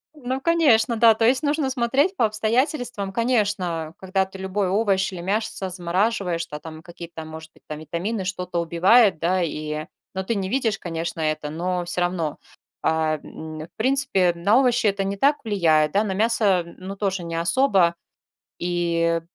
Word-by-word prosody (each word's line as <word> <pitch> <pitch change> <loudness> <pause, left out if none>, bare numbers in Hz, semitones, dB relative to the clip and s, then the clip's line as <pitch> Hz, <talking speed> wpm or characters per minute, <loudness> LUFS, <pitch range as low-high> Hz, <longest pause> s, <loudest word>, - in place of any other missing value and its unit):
Ну, 260 -2 -3
конечно, 265 -8 +3
да, 225 0 +6
то 225 - +1
есть 255 +4 +3
нужно 290 -2 0
смотреть 265 +9 +1
по 235 - +3
обстоятельствам. 220 -1 -1
Конечно, 200 -9 -1
когда 190 0 0
ты 190 0 -12
любой 190 +1 -1
овощ 195 -2 +1
или 175 -2 -7
мясо 200 0 -2
замораживаешь, 180 -1 -1
да, 150 - -7
там 160 0 -10
какие-то, 170 -2 -9
может 160 0 -10
быть, - - -24
там 150 0 -6
витамины 185 +6 -3
что-то 180 -2 -3
убивает, 185 +4 +4
да, 180 +2 +1
и 155 -2 -3 0.3
Ну, 190 - -2
ты 225 +3 -1
не 190 -1 -2
видишь, 230 -5 0
конечно, 170 -2 -4
это, 155 -1 -1
но 175 +2 -2
всё 175 +1 -2
равно. 175 -4 -1 0.5
А, 160 -1 +1
м, 155 +1 -9
в 160 - -9
принципе, 255 -6 +2
м, 170 0 -12
на 215 +7 +5
овощи 245 -3 +2
это 200 -1 +1
не 195 +1 -3
так 285 +7 +3
влияет, 165 -8 +2
да, 200 +2 +3
на 200 -3 -2
мясо, 205 -3 +2
м, 170 - -14
ну, 190 +2 -7
тоже 195 -3 -2
не 170 0 -6
особо. 170 0 +2 0.7
И, 170 -1 0
190 Hz, 175 wpm, -23 LUFS, 170-225 Hz, 0.7 s, да